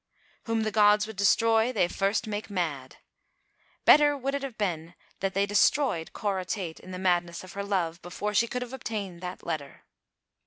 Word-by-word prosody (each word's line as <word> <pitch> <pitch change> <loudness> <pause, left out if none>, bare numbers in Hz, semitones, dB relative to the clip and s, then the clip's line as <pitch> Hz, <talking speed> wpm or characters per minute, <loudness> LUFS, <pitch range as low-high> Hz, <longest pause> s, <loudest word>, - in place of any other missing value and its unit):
" - - -35
Whom 225 -1 0
the 215 - -1
gods 210 0 +5
would 220 0 -9
destroy 225 +4 +3
they 205 -7 +2
first 200 +6 0
make 215 0 -4
mad." 155 -9 -3 0.9
Better 290 -1 +6
would 275 +1 -2
it 280 - -1
have 270 -4 -6
been 175 -4 -3 0.3
had 195 0 -1
they 200 +1 +3
destroyed 205 - +2
Cora 195 -3 -2
Tate 180 -4 -4
in - - -13
the 185 - -5
madness 175 -2 0
of 185 - -11
her 200 - -4
love, 175 -5 -1
before 205 +4 -4
she 235 +3 +3
could 250 +1 -3
have 250 +1 -10
obtained 205 -8 -5
that 180 0 -7
letter. 155 -4 -5
200 Hz, 190 wpm, -28 LUFS, 175-225 Hz, 0.9 s, Better